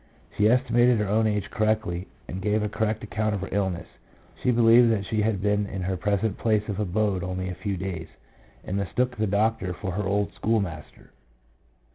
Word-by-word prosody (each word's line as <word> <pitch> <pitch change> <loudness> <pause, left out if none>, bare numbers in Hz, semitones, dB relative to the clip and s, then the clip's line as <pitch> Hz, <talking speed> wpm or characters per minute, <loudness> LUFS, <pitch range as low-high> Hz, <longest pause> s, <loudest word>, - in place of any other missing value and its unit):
She 105 +1 +4
estimated 120 -1 +4
her 105 -1 0
own 110 +2 +2
age 105 -1 -1
correctly, 110 -5 0 0.2
and 95 - -5
gave 105 +1 +1
a 105 - -1
correct 110 +1 -1
account 110 -1 -1
of 100 - -4
her 100 - -5
illness. 95 -3 -1 0.6
She - - +1
believed 120 0 +6
that 100 -3 0
she 110 +2 0
had 105 -3 0
been 105 0 +1
in 95 -2 -5
her 95 +1 -1
present 100 +2 -1
place 105 -2 +1
of 105 -2 -3
abode 100 -1 0
only 95 +1 -3
a - - -3
few 100 -3 -2
days, 90 -3 -4 0.6
and 95 - -2
mistook 125 +6 -1
the 110 -2 0
doctor 105 -2 +1
for 95 -1 -4
her 100 +4 -2
old 100 -1 0
schoolmaster. 100 -9 -3
105 Hz, 190 wpm, -26 LUFS, 95-110 Hz, 0.6 s, believed